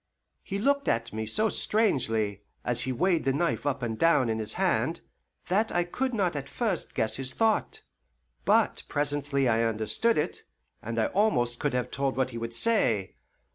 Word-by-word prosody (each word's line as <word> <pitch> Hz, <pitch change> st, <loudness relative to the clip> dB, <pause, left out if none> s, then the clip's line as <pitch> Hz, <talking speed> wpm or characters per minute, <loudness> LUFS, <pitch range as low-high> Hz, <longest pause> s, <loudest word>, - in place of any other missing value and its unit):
He 195 Hz, -, -4 dB
looked 280 Hz, +6 st, +1 dB
at 115 Hz, -1 st, 0 dB
me 110 Hz, 0 st, -3 dB
so 215 Hz, -, +1 dB
strangely, 115 Hz, -, +1 dB, 0.2 s
as 120 Hz, -1 st, +1 dB
he 130 Hz, -, -2 dB
weighed 170 Hz, +6 st, +1 dB
the 135 Hz, -, +2 dB
knife 150 Hz, 0 st, -1 dB
up 140 Hz, -2 st, -1 dB
and 110 Hz, -2 st, -3 dB
down 145 Hz, -7 st, +4 dB
in 110 Hz, -, -2 dB
his 110 Hz, 0 st, -1 dB
hand, -, -, 0 dB, 0.5 s
that 210 Hz, +5 st, +1 dB
I 175 Hz, -, +1 dB
could 255 Hz, +9 st, -2 dB
not 195 Hz, -8 st, 0 dB
at 140 Hz, -1 st, -5 dB
first 215 Hz, -9 st, -2 dB
guess 110 Hz, -, 0 dB
his 130 Hz, 0 st, -3 dB
thought; 220 Hz, +4 st, 0 dB, 0.6 s
but -, -, +2 dB
presently 145 Hz, -2 st, +1 dB
I 115 Hz, -1 st, +2 dB
understood 115 Hz, -, +1 dB
it, -, -, -2 dB, 0.4 s
and -, -, -5 dB
I -, -, +3 dB
almost 200 Hz, -, +1 dB
could 145 Hz, -3 st, -1 dB
have 125 Hz, -, -2 dB
told 135 Hz, 0 st, -1 dB
what 130 Hz, -1 st, 0 dB
he 115 Hz, -, -5 dB
would 115 Hz, 0 st, -5 dB
say. 115 Hz, -, +1 dB
140 Hz, 180 wpm, -28 LUFS, -, 0.6 s, down